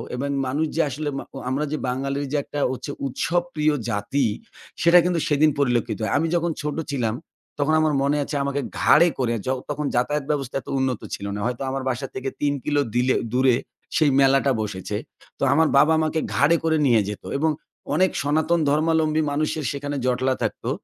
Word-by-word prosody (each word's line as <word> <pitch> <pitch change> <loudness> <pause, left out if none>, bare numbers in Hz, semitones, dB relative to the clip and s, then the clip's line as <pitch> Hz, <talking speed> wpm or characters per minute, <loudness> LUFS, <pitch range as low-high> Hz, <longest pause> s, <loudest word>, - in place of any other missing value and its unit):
এবং 140 +3 -3 0.2
মানুষ 145 +5 0
যে 165 - +3
আসলে 145 +3 -3
মা - - -4
ও - - -5
আমরা 140 +4 0
যে 155 - -1
বাঙালির 135 +3 -2
যে 150 - +1
একটা 145 - -6
হচ্ছে 130 +3 -5 0.2
উৎসব 170 +6 0
প্রিয় 155 -1 +2 0.2
জাতি। 115 +6 0 0.6
সেটা 170 +2 +7
কিন্তু 180 -2 +1
সেদিন 150 +1 +4
পরিলক্ষিত 120 -5 +1
হয়। 105 - -1
আমি 160 +3 +1
যখন 170 0 +1
ছোট 150 0 -3 0.2
ছিলাম 115 -5 0 0.4
তখন 145 +2 +2
আমার 155 -1 +2
মনে 140 +2 +2
আছে, 145 - -5
আমাকে 140 0 -1 0.2
ঘাড়ে 165 +3 +6
করে 120 -3 +1
য - - -8 0.2
তখন 150 0 -2
যাতায়াত 140 +4 0
ব্যবস্থা 135 -4 -3
এত - - -30
উন্নত 130 -3 -1
ছিল 100 - -8
না। - - -4
হয়তো 125 +1 -2
আমার 135 0 -3
বাসা 130 +2 -3
থেকে 130 +1 -3
৩ 145 -1 +2
কিলো 145 -1 +1
দিলে 125 +1 +3 0.2
দূরে 130 -1 +4 0.4
সেই 155 -2 +4
মেলাটা 135 0 +4
বসেছে। 95 -3 -4 0.4
তো - - -2
আমার 160 +2 +4
বাবা 150 +3 +6
আমাকে 160 0 0 0.2
ঘাড়ে 150 +4 +4
করে 160 -1 +2
নিয়ে 115 -4 +4
যেত। 105 - -7
এবং 160 +3 +2 0.5
অনেক 185 0 +3
সনাতন, 155 +4 +1
ধর্মাবলম্বী 155 +1 +2
মানুষের 155 +1 -1
সেখানে 145 0 -4
জটলা 130 +1 +1
থাকতো। - - -3
145 Hz, 190 wpm, -23 LUFS, 130-155 Hz, 0.6 s, সেটা